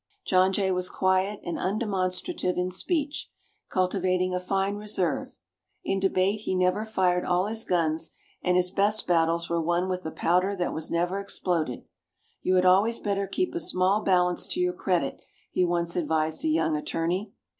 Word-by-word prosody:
John 185 0 +4
Jay 190 -1 +1
was 180 0 -1
quiet 190 +2 +1
and 175 - -4
undemonstrative 190 - -1
in 180 +1 0
speech, 290 - -1 0.4
cultivating 185 -1 +1
a 180 - 0
fine 195 +2 -1
reserve. 190 -7 -2 0.5
In 195 - 0
debate 195 +2 +1
he 195 -3 -2
never 185 +4 +1
fired 185 -5 +1
all 180 +1 +1
his 220 +1 -1
guns, 165 -2 0 0.3
and 180 0 +2
his 180 0 +2
best 205 +2 +1
battles 170 -1 +2
were 170 0 0
won 175 +3 0
with 185 -1 -2
the 160 - -5
powder 180 +5 +1
that 180 -2 -2
was 160 0 -3
never 175 +3 0
exploded. 175 -9 -2 0.6
"You 185 - +1
had 180 0 +3
always 200 +6 +4
better 200 -1 -1
keep 365 - -1
a 345 - -2
small 190 - +1
balance 180 -3 +2
to - - -3
your 360 0 +1
credit," - - -1 0.3
he 185 - +2
once 170 -1 0
advised 160 -1 0
a - - +1
young 160 0 +2
attorney. 170 +6 -2
185 Hz, 170 wpm, -27 LUFS, 175-200 Hz, 0.6 s, John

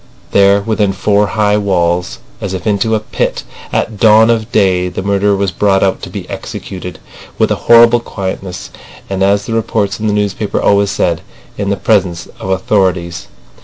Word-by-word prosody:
There 100 0 +4
within 105 -2 0
four 100 +2 +1
high 105 0 +1
walls, 90 -3 0 0.2
as 95 -1 -3
if 90 - -7
into 110 +1 +1
a - - 0
pit, 110 - -3 0.3
at 110 -3 -2
dawn 110 +1 +6
of 115 0 -2
day, 95 -5 +2
the 95 - -5
murderer 100 +1 +1
was 100 -1 -1
brought 95 +1 +2
out 95 - 0
to - - -7
be - - -7
executed, 90 -1 -7 0.4
with - - +1
a - - +2
horrible 120 0 +7
quietness 95 -4 -6 0.4
and, 95 0 -2
as 100 +2 +2
the 115 - -4
reports 110 -3 -1
in 110 - -2
the 105 - +1
newspapers 105 0 -1
always 100 0 +3
said, 90 -3 0 0.3
"in 100 -1 -3
the 100 - 0
presence 95 -5 0
of - - -6
the 95 - +2
authorities." 90 -3 -1
100 Hz, 180 wpm, -14 LUFS, 95-105 Hz, 0.4 s, horrible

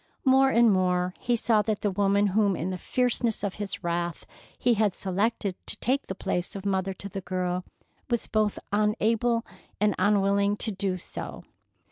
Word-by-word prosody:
More 265 0 +5
and 235 -3 +5
more 180 -1 +1
he 240 - +1
saw 225 -2 +3
that 210 0 -2
the 205 - +1
woman 200 +1 +2
whom 205 -2 +3
in 175 +3 -3
the 185 - -3
fierceness 240 -2 0
of 200 -2 -1
his 200 -2 -4
wrath 170 -1 -2 0.3
he 245 - +3
had 210 -3 +1
selected 200 +1 -1
to - - -1
take 270 +3 0
the 190 - -4
place 180 0 -2
of 195 0 -6
mother 190 -1 0
to 200 - -8
the 195 0 -6
girl 180 0 -2 0.5
was 235 -2 0
both 215 -1 0 0.2
unable 225 +2 +1 0.3
and 210 -1 +3
unwilling 200 +1 +2
to 220 - -1
do 190 -1 -2
so. - - -7
200 Hz, 175 wpm, -27 LUFS, 185-220 Hz, 0.5 s, More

